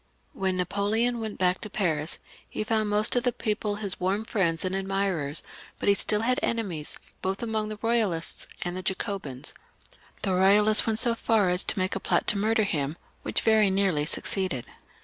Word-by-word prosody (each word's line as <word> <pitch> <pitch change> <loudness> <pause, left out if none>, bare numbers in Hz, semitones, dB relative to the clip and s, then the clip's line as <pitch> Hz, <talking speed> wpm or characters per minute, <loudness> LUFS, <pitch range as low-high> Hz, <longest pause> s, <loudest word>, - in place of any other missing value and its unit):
When 190 -1 -1
NaJ)oleon 205 +6 +1
went 220 -2 -5
back 180 0 +2
to 215 - -5
Paris 160 -7 0 0.3
he - - -2
found 215 -1 0
most 210 +2 +2
of 245 - +3
the 245 - +1
people 210 -2 -2
his 205 -2 -1
warm 195 +4 0
friends 170 -6 0
and 185 - -1
admirers; 195 -6 -1 0.3
but - - -4
he - - +7
stiU 210 +1 +2
had 250 +3 +1
enemies, 190 -10 -2 0.2
both 190 +4 -2
among 220 -2 -1
the 215 - -5
Boyalists 215 -7 0 0.2
and 175 0 -3
the 185 - -3
Jacobins. 185 - -3 0.7
The 195 - 0
Eoyalists 205 +4 +5
went 220 -1 +1
so 235 0 +6
far 220 -4 +2
as 180 +1 +2
to - - 0
make 185 0 0
a - - -2
plot - - 0
to 205 - +3
murder 220 +2 +2
him, 150 -5 -2 0.2
which - - 0
very 220 -2 +4
nearly 190 -6 +1
succeeded. 185 - -1
200 Hz, 185 wpm, -27 LUFS, 185-215 Hz, 0.7 s, he